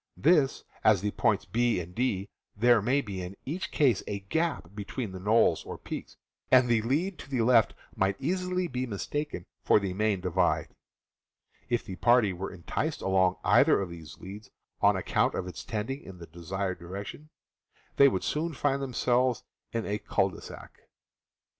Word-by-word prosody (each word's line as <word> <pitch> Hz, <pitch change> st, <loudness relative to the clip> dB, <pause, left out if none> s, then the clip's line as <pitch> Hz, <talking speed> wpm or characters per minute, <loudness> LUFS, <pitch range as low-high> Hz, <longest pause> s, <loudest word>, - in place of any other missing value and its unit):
Thus, 150 Hz, -3 st, +3 dB, 0.2 s
at 110 Hz, -2 st, +6 dB
the 105 Hz, +1 st, -1 dB
points -, -, +1 dB
B 120 Hz, +2 st, +1 dB
and 90 Hz, +1 st, -7 dB
D 105 Hz, -5 st, -1 dB, 0.3 s
there 120 Hz, 0 st, +5 dB
may 130 Hz, +7 st, +2 dB
be 100 Hz, -7 st, -6 dB
in 90 Hz, +2 st, -7 dB
each 165 Hz, +8 st, -3 dB
case 130 Hz, -9 st, +3 dB
a 100 Hz, -1 st, -3 dB
gap 160 Hz, -, -2 dB
between 105 Hz, +2 st, -5 dB
knolls 110 Hz, +3 st, +3 dB
or -, -, -7 dB
peaks, -, -, -7 dB, 0.3 s
and 130 Hz, -1 st, +6 dB
the 115 Hz, -2 st, +3 dB
lead 155 Hz, -, -1 dB
to -, -, -10 dB
the 130 Hz, -4 st, 0 dB
left 115 Hz, -2 st, +4 dB, 0.2 s
might 95 Hz, 0 st, +1 dB
easily 180 Hz, +3 st, -1 dB
be 130 Hz, -3 st, -3 dB
mistaken 120 Hz, -, -4 dB, 0.2 s
for -, -, +5 dB
the 100 Hz, -2 st, -3 dB
main 105 Hz, 0 st, +1 dB
divide. 90 Hz, 0 st, +1 dB, 1.0 s
If 120 Hz, -1 st, 0 dB
the 95 Hz, -, -7 dB
party 120 Hz, -5 st, +4 dB
were 95 Hz, +2 st, -5 dB
enticed 85 Hz, -3 st, -3 dB
along 95 Hz, -1 st, +3 dB
either -, -, +5 dB
of 95 Hz, -3 st, -3 dB
these 80 Hz, -3 st, -10 dB
leads, 100 Hz, +3 st, -10 dB, 0.3 s
on -, -, +5 dB
account -, -, +1 dB
of -, -, -2 dB
its 90 Hz, -3 st, -7 dB
trending 120 Hz, +5 st, -3 dB
in 95 Hz, -, -11 dB
the 85 Hz, -, -9 dB
de 85 Hz, +1 st, -13 dB
sired 95 Hz, +1 st, -2 dB
direction, 100 Hz, -, -8 dB, 0.7 s
they 140 Hz, -, +8 dB
would 95 Hz, -9 st, 0 dB
soon 160 Hz, +2 st, -1 dB
find 140 Hz, 0 st, 0 dB
themselves 125 Hz, -1 st, +1 dB, 0.3 s
in 115 Hz, -1 st, -2 dB
a 105 Hz, +1 st, -2 dB
cul -, -, +1 dB
de -, -, -11 dB
sac. -, -, -11 dB
110 Hz, 175 wpm, -29 LUFS, 95-130 Hz, 1.0 s, they